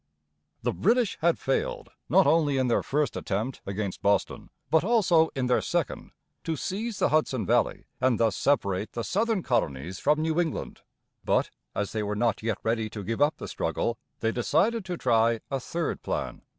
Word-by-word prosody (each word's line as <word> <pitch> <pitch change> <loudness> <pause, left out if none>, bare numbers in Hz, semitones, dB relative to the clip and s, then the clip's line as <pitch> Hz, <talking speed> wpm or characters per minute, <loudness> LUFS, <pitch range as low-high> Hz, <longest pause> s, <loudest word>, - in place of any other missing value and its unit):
The - - 0
British 240 -2 +2
had 170 +1 +3
failed - - -2 0.2
not - - +5
only 150 -4 +3
in 130 -1 +1
their 115 - +3
first 150 +1 -1
attempt, 110 +7 -3
against 100 -1 -3
Boston, 100 -2 0 0.2
but 160 0 +4
also 185 -7 +4
in 130 -2 0
their 125 0 +2
second, 170 -10 -2 0.3
to 165 - -1
seize 205 - -3
the - - +2
Hudson 135 -8 +1
valley - - +1
and 130 -2 +2
thus 115 -3 +2
separate 100 -8 0
the 120 - -3
southern 215 - 0
colonies 90 - -1
from 150 +1 +2
New 160 +1 0
England. 160 -3 -4 0.4
But - - +1 0.2
as 100 - -1
they 110 - -2
were 105 0 -2
not 115 +1 +1
yet 110 -2 -1
ready 110 -1 0
to 105 -2 -7
give 115 +6 -3
up 145 +2 +3
the - - -7
struggle, 115 0 -2 0.2
they 115 - +1
decided 190 - +1
to 180 -2 -4
try 115 -3 +3
a 135 - 0
third 165 +5 -3
plan. - - -3
130 Hz, 180 wpm, -27 LUFS, 110-165 Hz, 0.4 s, not